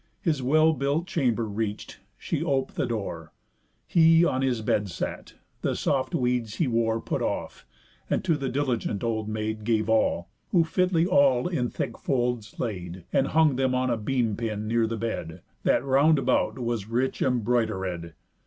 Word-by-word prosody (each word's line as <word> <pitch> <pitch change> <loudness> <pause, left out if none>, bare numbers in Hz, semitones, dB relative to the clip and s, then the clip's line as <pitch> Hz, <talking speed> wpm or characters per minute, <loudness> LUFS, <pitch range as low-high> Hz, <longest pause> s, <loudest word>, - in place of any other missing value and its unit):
His 155 -6 0
well 155 +5 +4
built 145 +3 0
chamber 125 - 0
reach'd, 105 0 -4 0.2
she - - -2
op'd 135 -1 0
the - - 0
door, 95 -9 -5 0.5
He 165 0 +5
on 130 -5 0
his 125 -4 0
bed 105 -1 0
sat, - - -5 0.3
the - - 0
soft 130 -2 0
weeds 125 -3 0
he 165 - +1
wore 115 -2 +1
Put - - -3
off, - - -4 0.4
and - - 0
to 170 -4 +2
the 135 -3 -3
diligent 125 -6 -1
old 110 -2 -1
maid 110 0 -3
Gave 110 -1 +1
all; 110 -5 +2 0.2
who 175 -4 +4
fitly 175 0 +1
all 140 -8 +4
in 130 -9 -1
thick - - -4
folds 120 -4 -1
laid, 90 -5 -4
And 135 - +3
hung 155 -3 +3
them 130 -1 +1
on 130 0 +1
a - - +2
beam 115 -1 0
pin 110 -2 -3
near 115 0 +2
the 115 0 -3
bed, 90 -7 -4 0.2
That - - +3
round 140 +4 +4
about 135 - +1
was 120 -4 -2
rich 125 +3 -1
embroidered. 110 -9 0
120 Hz, 170 wpm, -26 LUFS, 110-140 Hz, 0.5 s, He